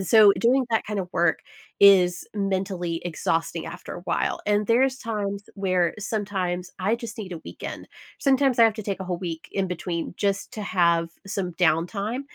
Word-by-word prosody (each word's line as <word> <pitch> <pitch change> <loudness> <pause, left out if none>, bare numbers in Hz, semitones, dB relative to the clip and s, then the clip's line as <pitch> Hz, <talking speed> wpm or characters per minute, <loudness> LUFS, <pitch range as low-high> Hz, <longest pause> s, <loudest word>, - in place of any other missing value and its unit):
so, 205 +2 +7
doing 255 +3 +3
that 225 - +1
kinda 200 -4 -3
work 170 -2 +2 0.4
is 185 -3 +6
mentally 190 -4 -2
exhausting 165 0 -1
after 175 +2 -8
a - - -8
while, - - -1
and 210 0 +2
there's 260 +3 +3
times 200 -3 -3
where 185 -4 +1
sometimes 190 -4 -2
I 195 +4 +1
just 235 -1 -7
need 190 -4 -6
a 170 - -5
weekend. - - -7 0.3
Sometimes 270 -2 +3
I 230 - +8
have 225 -2 +4
to 215 - -6
take 195 -1 -3
a 190 - -3
whole 180 -1 -3
week, 165 -3 -5
in 195 -1 0
between, 175 -1 -4
just 200 -1 -1
to 215 - -5
have 170 -3 +2 0.2
some 190 -2 -3
downtime, 185 - +1
195 Hz, 175 wpm, -25 LUFS, 175-215 Hz, 0.4 s, I